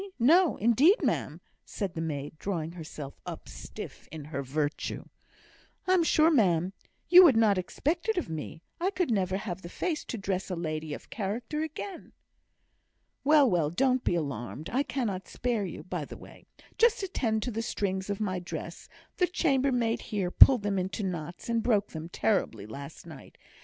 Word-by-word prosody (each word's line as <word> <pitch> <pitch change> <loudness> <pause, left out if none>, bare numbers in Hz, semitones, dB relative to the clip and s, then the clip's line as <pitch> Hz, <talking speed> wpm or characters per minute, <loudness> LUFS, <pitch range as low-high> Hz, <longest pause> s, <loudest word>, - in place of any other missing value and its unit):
no, 325 +8 +5
indeed, 245 - +5
ma'am," - - -1 0.2
said 195 -5 -4
the 165 - -4
maid, 145 -2 -4
drawing 165 -5 -3
herself 155 -4 -8
up, - - -8
stiff - - -9
in 155 -2 -7
her 140 -2 -4
virtue. 145 +2 -3 0.8
"I'm 370 -1 +4
sure, 320 0 +4
ma'am, 185 - +3 0.3
you 365 +1 +10
would 280 -10 +6
not 210 -4 +4
expect 315 - -2
it 440 - +1
of 355 - -1
me; 160 +1 -6 0.2
I 360 +3 +1
could 365 -8 -1
never 190 -3 +1
have 190 -3 -5
the 170 - -8
face 320 - -2
to 235 - -4
dress 195 -2 -2
a 185 - -2
lady 155 -2 -3
of - - -14
character 225 +8 -3
again." 320 +4 -6 1.1
"Well, 295 -1 +6
well! 170 -8 +2
don't 255 - +1
be - - +1
alarmed; 140 - -4
I 260 - +2
cannot 230 -10 -3
spare 235 -4 -1
you; 175 - -7
by 180 -5 -4
the - - -10
way, - - -15 0.3
just 455 -3 +4
attend 225 - -1
to 250 - -3
the 225 +1 -2
strings 190 -4 -2
on 200 - -1
my 185 -4 -1
dress; 175 - -7 0.3
the 360 - +3
chambermaid 265 -8 +1
here 195 -5 -2
pulled 250 0 +8
them 200 -2 0
into 190 +3 -3
knots, 175 -2 -5
and 230 -1 +1
broke 210 -3 +2
them 160 +1 -7
terribly, 170 - 0
last 140 +10 -9
night. 155 -6 -12
200 Hz, 175 wpm, -29 LUFS, 165-260 Hz, 1.1 s, you